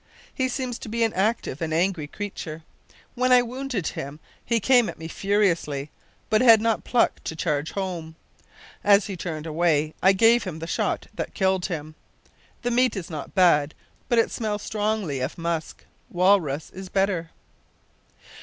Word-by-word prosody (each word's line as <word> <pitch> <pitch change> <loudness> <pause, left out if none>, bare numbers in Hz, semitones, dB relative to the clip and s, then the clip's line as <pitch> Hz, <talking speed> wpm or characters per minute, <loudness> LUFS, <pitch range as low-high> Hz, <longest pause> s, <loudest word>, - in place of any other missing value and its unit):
He 260 - 0
seems 255 -2 -3
to - - -8
be 230 +1 0
an 225 - +1
active 195 - -1
and 160 -1 -2
an 160 - +2
angry 175 -4 0
creature. 165 -4 -6 0.5
When 255 +1 +1
I 250 -1 +7
wounded 250 -5 -4
him 140 +2 -7 0.2
he 235 0 +1
came 245 +1 +4
at - - -8
me 160 - -7
furiously, 170 -7 0 0.4
but 215 +1 +3
had 230 -3 +8
not 225 0 0
pluck 245 - +1
to 160 - -4
charge 155 -2 -1
home. 175 -5 -4 0.7
As 205 0 +5
he 195 - -5
turned 165 -3 -5
away 155 -1 +1
I 190 - +6
gave 230 +4 +5
him 180 -5 -5
the 160 - -6
shot - - -1
that - - -5
killed 190 -1 +1
him. 155 -4 -5 0.7
The 245 - 0
meat 250 0 +3
is 180 -3 -6
not 150 -3 -7
bad, 160 -5 +4 0.3
but 240 - +2
it 230 - +3
smells 210 -2 -3
strongly 210 -9 -1
of 130 - -3
musk. 170 -1 -4 0.2
Walrus 175 -5 +2
is 190 0 -9
better. 190 -4 0
190 Hz, 170 wpm, -25 LUFS, 160-225 Hz, 0.7 s, had